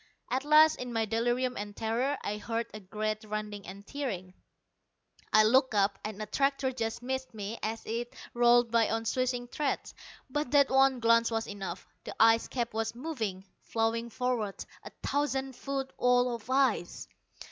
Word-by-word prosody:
At 260 Hz, +2 st, 0 dB
last, 305 Hz, +1 st, +6 dB
in 250 Hz, -1 st, -5 dB
my 225 Hz, -1 st, +1 dB
delirium 240 Hz, +3 st, 0 dB
and 205 Hz, 0 st, -6 dB
terror, 240 Hz, +6 st, 0 dB
I 210 Hz, -, -2 dB
heard 230 Hz, +2 st, -2 dB
a 215 Hz, -, -6 dB
great 215 Hz, +2 st, -3 dB
rending 210 Hz, -1 st, -5 dB
and 195 Hz, +2 st, -9 dB
tearing. 200 Hz, -11 st, -4 dB, 1.0 s
I 215 Hz, -, +7 dB
looked 260 Hz, +2 st, +4 dB
up, 200 Hz, -1 st, +2 dB
and 215 Hz, -1 st, -5 dB
a 215 Hz, -, -3 dB
tractor 275 Hz, +3 st, +1 dB
just 230 Hz, -1 st, -3 dB
missed 260 Hz, -1 st, -3 dB
me 210 Hz, +2 st, -5 dB
as 225 Hz, +1 st, -3 dB
it 235 Hz, +2 st, -4 dB, 0.2 s
rolled 240 Hz, -1 st, +4 dB
by 230 Hz, -2 st, +3 dB
on 225 Hz, +1 st, -1 dB
swishing 245 Hz, +1 st, -1 dB
treads. 290 Hz, +3 st, -2 dB, 0.3 s
But 295 Hz, 0 st, -2 dB
that 280 Hz, -1 st, +5 dB
one 265 Hz, -1 st, +4 dB
glance 230 Hz, 0 st, +4 dB
was 225 Hz, -1 st, -1 dB
enough. 195 Hz, -3 st, -6 dB, 0.2 s
The -, -, -7 dB
ice 225 Hz, +1 st, +5 dB
cap 240 Hz, -3 st, -3 dB
was 225 Hz, +1 st, -2 dB
moving, 230 Hz, -9 st, -4 dB, 0.2 s
flowing 230 Hz, +1 st, -1 dB
forward, 235 Hz, -5 st, -2 dB, 0.2 s
a -, -, -9 dB, 0.2 s
thousand 270 Hz, -2 st, -1 dB
foot 270 Hz, +1 st, -4 dB
wall 250 Hz, 0 st, +3 dB
of 230 Hz, 0 st, -8 dB
ice! 260 Hz, -9 st, +1 dB
230 Hz, 170 wpm, -30 LUFS, 215-260 Hz, 1.0 s, I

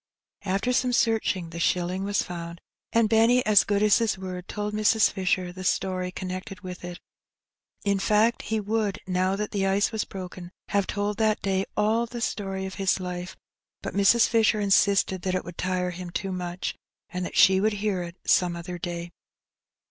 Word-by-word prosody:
After 200 Hz, +6 st, 0 dB
some 250 Hz, 0 st, +1 dB
searching 220 Hz, -8 st, +1 dB
the 170 Hz, -, -6 dB
shilling 180 Hz, +2 st, 0 dB
was 200 Hz, 0 st, 0 dB
found, 170 Hz, -1 st, -7 dB, 0.3 s
and 230 Hz, -1 st, +3 dB
Benny, 230 Hz, +3 st, +4 dB
as 210 Hz, -2 st, +6 dB
good 205 Hz, 0 st, +1 dB
as 210 Hz, +1 st, +5 dB
his 225 Hz, -4 st, 0 dB
word, 185 Hz, -1 st, -6 dB
told 210 Hz, 0 st, -4 dB
Mrs. 215 Hz, +1 st, +3 dB
Fisher 185 Hz, -2 st, -1 dB
the 185 Hz, +1 st, -8 dB
story 185 Hz, 0 st, -1 dB
connected 185 Hz, +2 st, -6 dB
with 180 Hz, -2 st, -8 dB
it. 175 Hz, 0 st, -7 dB, 0.8 s
In 200 Hz, -1 st, +1 dB
fact, 215 Hz, +4 st, +2 dB
he 220 Hz, 0 st, -2 dB
would, 210 Hz, -1 st, -1 dB
now 185 Hz, +1 st, +1 dB
that 210 Hz, +1 st, -3 dB
the 195 Hz, -1 st, 0 dB
ice 195 Hz, +2 st, +2 dB
was 220 Hz, -2 st, -1 dB
broken, 180 Hz, -2 st, -8 dB, 0.2 s
have 200 Hz, -1 st, +1 dB
told 205 Hz, 0 st, -2 dB
that 215 Hz, -1 st, +1 dB
day 195 Hz, -1 st, 0 dB
all 220 Hz, +3 st, +2 dB
the 240 Hz, +1 st, -6 dB
story 195 Hz, -4 st, -3 dB
of 190 Hz, -, -6 dB
his 190 Hz, 0 st, +2 dB
life, 180 Hz, 0 st, -5 dB, 0.5 s
but -, -, -4 dB
Mrs. 200 Hz, +4 st, +5 dB
Fisher 225 Hz, -2 st, +3 dB
insisted 195 Hz, -2 st, +3 dB
that 185 Hz, 0 st, -1 dB
it 185 Hz, -, -2 dB
would 175 Hz, -1 st, -10 dB
tire 180 Hz, 0 st, -1 dB
him 180 Hz, 0 st, -7 dB
too 190 Hz, +2 st, -3 dB
much, 180 Hz, 0 st, -4 dB, 0.3 s
and 180 Hz, 0 st, -4 dB
that -, -, -5 dB
she 190 Hz, 0 st, +6 dB
would 215 Hz, +1 st, +2 dB
hear 205 Hz, -2 st, -1 dB
it 170 Hz, 0 st, -7 dB
some 175 Hz, -1 st, +3 dB
other 175 Hz, +1 st, -6 dB
day. 170 Hz, 0 st, -5 dB
195 Hz, 185 wpm, -26 LUFS, 180-210 Hz, 0.8 s, as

